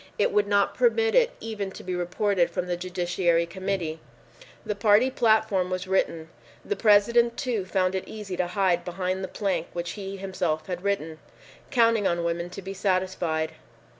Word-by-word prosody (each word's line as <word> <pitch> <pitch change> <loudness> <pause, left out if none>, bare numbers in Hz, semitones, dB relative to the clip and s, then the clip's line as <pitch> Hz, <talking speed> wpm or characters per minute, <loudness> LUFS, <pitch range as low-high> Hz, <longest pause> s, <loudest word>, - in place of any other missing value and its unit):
It 205 - +2
would 205 0 +2
not 200 0 +2
permit 455 -2 +2
it - - +5
even 215 -3 -4
to - - -10
be 185 - -4
reported 180 +1 +1
from 175 +1 -3
the 180 -1 -1
Judiciary 175 -1 0
Committee. 180 -3 -3 0.7
The 210 - -1
party 210 +5 +4
platform 220 -6 +2
was 185 0 -3
written. 165 -4 0 0.4
The 415 - -1
President, 235 - +4
too, 235 -8 -1
found 185 -1 +1
it 190 - -3
easy 210 -4 -6
to 180 - 0
hide 180 -2 +1
behind 185 +1 -3
the - - -2
plank 185 -5 -2
which 175 0 -3
he 195 -2 -6
had 195 - -8
himself 180 -5 -1 0.2
written, 165 -6 -2 0.5
counting 230 -4 +3
on 170 0 0
women 170 +1 -2
to 190 +2 -9
be 195 +1 -5
satisfied. 185 -5 -1
190 Hz, 170 wpm, -26 LUFS, 175-210 Hz, 0.7 s, it